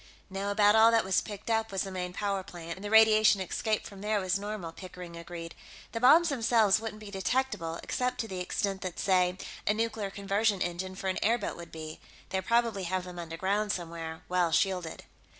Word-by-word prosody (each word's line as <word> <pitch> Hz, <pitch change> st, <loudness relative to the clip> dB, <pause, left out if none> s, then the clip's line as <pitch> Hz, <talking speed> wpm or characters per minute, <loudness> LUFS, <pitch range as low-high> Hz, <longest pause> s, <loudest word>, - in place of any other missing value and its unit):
"No, 195 Hz, +1 st, -3 dB
about 205 Hz, +1 st, +4 dB
all 220 Hz, +1 st, +7 dB
that 230 Hz, -1 st, +3 dB
was 190 Hz, -1 st, +2 dB
picked 205 Hz, +1 st, -6 dB
up 225 Hz, -1 st, +1 dB
was 195 Hz, -, 0 dB
the 195 Hz, -, -6 dB
main 180 Hz, -1 st, -4 dB
power 200 Hz, +1 st, -1 dB
plant, 170 Hz, -3 st, -8 dB
and 190 Hz, -, -12 dB
the 205 Hz, -, -4 dB
radiation 220 Hz, -1 st, +6 dB
escape 215 Hz, +3 st, -1 dB
from 195 Hz, -1 st, -10 dB
there 210 Hz, 0 st, +1 dB
was 185 Hz, +1 st, 0 dB
normal," 205 Hz, -5 st, -5 dB
Pickering 180 Hz, -1 st, -10 dB
agreed. 170 Hz, 0 st, -8 dB, 0.4 s
"The 230 Hz, -, -3 dB
bombs 320 Hz, +8 st, +6 dB
themselves 225 Hz, -6 st, +3 dB
wouldn't 220 Hz, -1 st, -6 dB
be 210 Hz, -1 st, -9 dB
detectable, 195 Hz, -5 st, -1 dB
except 250 Hz, 0 st, -1 dB
to 225 Hz, -, -5 dB
the 190 Hz, -3 st, -5 dB
extent 195 Hz, +1 st, -2 dB
that, 185 Hz, -2 st, -5 dB
say, 185 Hz, -2 st, +2 dB, 0.3 s
a 210 Hz, -, +3 dB
nuclear 225 Hz, -2 st, -1 dB
conversion 200 Hz, +1 st, 0 dB
engine 180 Hz, +2 st, -3 dB
for 190 Hz, -, -5 dB
an 185 Hz, -, 0 dB
airboat 230 Hz, +3 st, +1 dB
would 170 Hz, 0 st, -10 dB
be. 155 Hz, -1 st, -7 dB, 0.3 s
They 190 Hz, -, -1 dB
probably 230 Hz, -2 st, +1 dB
have 185 Hz, +1 st, -1 dB
them 180 Hz, -1 st, -8 dB
underground, 190 Hz, +5 st, -1 dB
somewhere, 165 Hz, -3 st, -5 dB
well 180 Hz, -2 st, +1 dB
shielded." 185 Hz, -4 st, 0 dB
195 Hz, 200 wpm, -30 LUFS, 180-215 Hz, 0.4 s, all